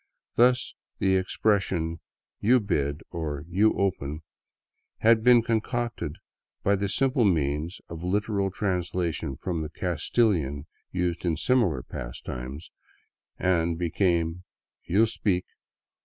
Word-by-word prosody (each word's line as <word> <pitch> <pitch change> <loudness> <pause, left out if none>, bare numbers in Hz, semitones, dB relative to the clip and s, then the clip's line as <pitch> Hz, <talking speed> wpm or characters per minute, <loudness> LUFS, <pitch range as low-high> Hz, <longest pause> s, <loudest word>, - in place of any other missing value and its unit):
Thus 125 +1 +3 0.2
the 95 -1 +2
expressions 95 -4 +1 0.2
" - - -66
You 125 +1 +7
bid," 75 -8 -1
or 75 -4 -4
" - - -21
You 100 +5 +3
open," 80 -6 -1 0.8
had 110 0 +5
been 120 -1 +7
concocted 115 - -1 0.5
by 100 - +4
the 100 0 -1
simple 130 +2 +2
means 80 -2 0
of 85 0 -8
literal 100 +1 0
translation 90 -6 -2
from 85 -3 -3
the 75 - -4
Castilian 85 - 0 0.3
used 90 -2 -1
in 85 -4 0
similar 95 - +2
pastimes, 65 +4 -7 0.7
and 85 -3 +1
became 85 0 0 0.2
" - - -59
You 100 +6 +5
speak." 100 -4 0
90 Hz, 120 wpm, -27 LUFS, 80-105 Hz, 0.8 s, You